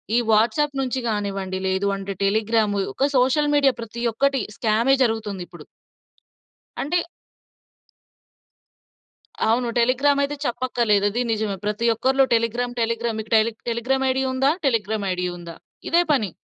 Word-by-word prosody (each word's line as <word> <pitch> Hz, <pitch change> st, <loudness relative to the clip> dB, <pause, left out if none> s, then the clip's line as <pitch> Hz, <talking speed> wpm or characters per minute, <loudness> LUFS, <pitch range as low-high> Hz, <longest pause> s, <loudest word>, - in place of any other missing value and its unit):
ఈ -, -, +4 dB
వాట్సాప్ 235 Hz, +7 st, +2 dB
నుంచి 260 Hz, 0 st, -2 dB
కానివ్వండి, 195 Hz, -3 st, -3 dB
లేదు 190 Hz, +1 st, 0 dB
అంటే 195 Hz, 0 st, -5 dB
టెలిగ్రామ్ 215 Hz, +1 st, +1 dB, 0.2 s
ఒక 275 Hz, +2 st, +1 dB
సోషల్ 290 Hz, +4 st, +2 dB
మీడియా 280 Hz, -2 st, +4 dB
ప్రతి 230 Hz, +1 st, -7 dB
ఒక్కటి 275 Hz, +3 st, +1 dB, 0.2 s
స్కామే 230 Hz, +4 st, +2 dB
జరుగుతుందిప్పుడు. 205 Hz, -8 st, -3 dB, 1.2 s
అంటే 315 Hz, +6 st, 0 dB, 2.5 s
అవును. 240 Hz, +2 st, +1 dB
టెలిగ్రామయితే 280 Hz, +4 st, +2 dB
చెప్పక్కర్లేదు. 235 Hz, -5 st, +1 dB
అది 240 Hz, +4 st, -1 dB
నిజమే 215 Hz, -3 st, -1 dB
ప్రతి 210 Hz, +2 st, -1 dB
ఒక్కరిలో 265 Hz, +4 st, +2 dB
టెలిగ్రామ్ 240 Hz, +2 st, -1 dB
టెలిగ్రామ్ 230 Hz, 0 st, -1 dB
మీకు 220 Hz, +1 st, -6 dB
టెలీ 220 Hz, +1 st, +2 dB, 0.2 s
టెలిగ్రామ్ 260 Hz, +3 st, 0 dB
ఐడీ 265 Hz, +1 st, 0 dB
ఉందా? 270 Hz, +2 st, +2 dB, 0.2 s
టెలిగ్రామ్ 220 Hz, -4 st, -1 dB
ఐడీ 180 Hz, 0 st, -2 dB
ఉందా? 170 Hz, -1 st, -9 dB, 0.3 s
ఇదే 340 Hz, +1 st, +4 dB
పని. 215 Hz, -, 0 dB
230 Hz, 125 wpm, -22 LUFS, 210-265 Hz, 2.5 s, ఈ